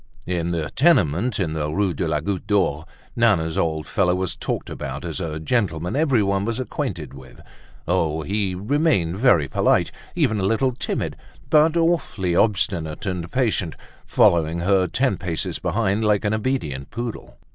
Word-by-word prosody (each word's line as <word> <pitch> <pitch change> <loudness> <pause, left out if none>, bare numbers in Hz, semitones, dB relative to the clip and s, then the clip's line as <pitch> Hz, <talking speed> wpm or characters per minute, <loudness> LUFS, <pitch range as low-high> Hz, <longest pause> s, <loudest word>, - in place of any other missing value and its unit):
In 85 -1 -1
the 80 -3 -2
tenement 120 - +2
in 85 -5 -1
the 75 -1 -2
Rue 95 +3 0
de 85 +3 -2
la 75 -2 0
Goutte 100 +3 -3
d'Or, 80 -7 +1 0.3
Nana's 95 -9 +2
old 80 -2 -1
fellow 90 -2 +1
was 95 -1 -2
talked - - -3
about 70 +4 -5
as 85 +1 -4
a 80 -4 -4
gentleman 85 -2 -1
everyone 110 -10 +2
was 115 +3 -2
acquainted 115 - -4
with. 65 -2 -13 0.5
Oh! 80 -1 0
he 95 +2 -1
remained 100 - +1
very 100 - +4
polite, - - +2 0.2
even 110 -1 +1
a - - -1
little 115 +7 +2
timid, 125 - -3 0.3
but 155 +2 +5
awfully 150 - +1
obstinate 95 -8 0
and 90 -3 -3
patient, 110 -10 0 0.3
following 85 0 +3
her 95 0 +3
ten 130 +1 0
paces 85 -4 -3
behind 110 -1 0
like 105 -1 +2
an 105 - +1
obedient 95 - -2
poodle. 120 -1 -6
95 Hz, 155 wpm, -22 LUFS, 80-110 Hz, 0.5 s, but